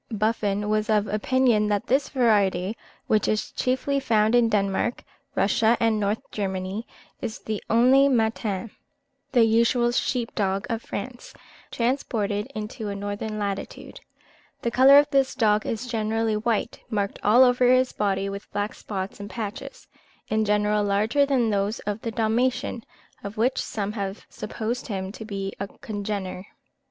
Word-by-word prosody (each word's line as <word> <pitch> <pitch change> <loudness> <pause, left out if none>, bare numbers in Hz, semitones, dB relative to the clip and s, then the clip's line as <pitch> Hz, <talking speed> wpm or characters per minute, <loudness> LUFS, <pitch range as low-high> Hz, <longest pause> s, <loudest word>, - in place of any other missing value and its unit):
Buffon 210 -2 0
was 215 +1 0
of 210 -1 +3
opinion 215 0 +2
that 205 -1 0
this 275 +3 +1
variety, 205 -6 +2 0.3
which 215 -1 +2
is 215 - -1
chiefly 260 +2 0
found 220 -4 +2
in 240 -1 +4
Denmark, 200 +2 0 0.3
Russia, 220 +3 +3
and 225 -2 +2
Northern 205 +1 -1
Germany, 190 +1 -3 0.3
is 220 - -4 0.3
only 255 +5 +5
the 270 - +3
Mâtin 220 -2 -1 0.6
(the 240 -3 +6
usual 235 +2 +3
sheep 240 -1 -1
dog 195 -1 -1
of 230 0 -2
France) 240 +4 -7 0.3
transported 225 -5 -1
into 215 +1 -5
a 200 - -4
northern 205 +2 -4
latitude. 200 -2 -5 0.6
The 235 - 0
colour 265 +3 +7
of 290 0 +6
this 270 -2 +2
dog 210 -1 +2
is 225 +2 -3
generally 225 -2 0
white, 225 +1 -1
marked 205 -3 -2
all 230 +5 +6
over 250 0 +4
his 255 0 +3
body 195 -1 0
with 200 +1 -7
black 205 +1 -2
spots 195 -1 -6
and 205 0 -7
patches, 215 -1 -6 0.4
in 215 0 +1
general 210 0 +2
larger 215 +8 +2
than 250 -5 +2
those 205 +2 0
of 210 +1 -4
the 230 - -3
Dalmatian, 235 +2 0 0.4
of 200 +2 -7
which 245 +4 +1
some 205 -1 -3
have 200 -2 -5
supposed 225 +3 -4
him 190 -3 -4
to 220 - -9
be 195 -2 -4
a 200 - -3
congener. 200 -2 -5
215 Hz, 150 wpm, -25 LUFS, 205-235 Hz, 0.6 s, colour